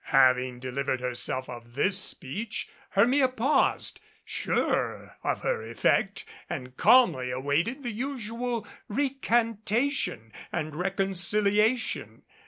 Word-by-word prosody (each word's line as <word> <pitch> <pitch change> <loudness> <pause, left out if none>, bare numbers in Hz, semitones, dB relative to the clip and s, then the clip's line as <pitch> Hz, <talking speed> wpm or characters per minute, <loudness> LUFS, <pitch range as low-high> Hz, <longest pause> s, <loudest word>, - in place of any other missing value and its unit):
Having 125 -2 +3
delivered 130 0 -2
herself 125 +1 -3
of 120 -1 -10
this 190 +7 +2
speech, 200 - -4 0.2
Hermia 255 +7 +4
paused, 255 +3 +1 0.3
sure - - -1
of - - -1
her - - 0
effect, 200 - 0 0.2
and 130 -6 -5
calmly 180 - +5
awaited 145 - -1
the 240 - -2
usual 235 -2 -3 0.2
recantation 235 - 0 0.2
and 155 -3 -3
reconciliation. 200 +5 +1
200 Hz, 95 wpm, -28 LUFS, -, 0.3 s, calmly